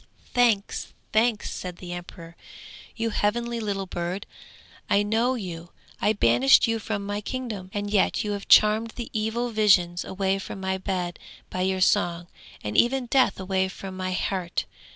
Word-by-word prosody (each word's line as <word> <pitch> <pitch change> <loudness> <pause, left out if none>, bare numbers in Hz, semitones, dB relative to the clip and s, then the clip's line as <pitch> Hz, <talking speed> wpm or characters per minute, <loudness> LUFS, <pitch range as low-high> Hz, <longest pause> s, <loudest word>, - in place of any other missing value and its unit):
'Thanks, 230 -5 +1 0.2
thanks!' 220 -1 +2
said 180 -1 -6
the 175 -1 -7
emperor; 170 -1 -9 0.6
'you 230 0 -1
heavenly 235 +3 0
little 200 -3 -2
bird, 180 +2 -4 0.6
I 200 - +4
know 225 +5 +1
you! 175 -6 -6 0.3
I 210 - +3
banished 125 - +5
you 225 0 0
from 205 -2 -3
my 205 +1 -3
kingdom, 220 -5 -5
and 205 0 -3
yet 205 -2 +2
you 210 - -2
have 200 -1 -4
charmed 215 +2 +5
the 235 - -6
evil 225 +3 -1
visions 190 -5 +3
away 195 0 -1
from 195 - -7
my 190 0 -2
bed 180 -2 -3 0.3
by 185 - -2
your 190 0 0
song, 175 -3 +2 0.4
and 105 0 -4
even 255 +1 +3
Death 260 -2 +2
away 190 0 0
from 190 0 -8
my 185 0 -3
heart! 185 -1 -2
200 Hz, 160 wpm, -25 LUFS, 185-220 Hz, 0.6 s, banished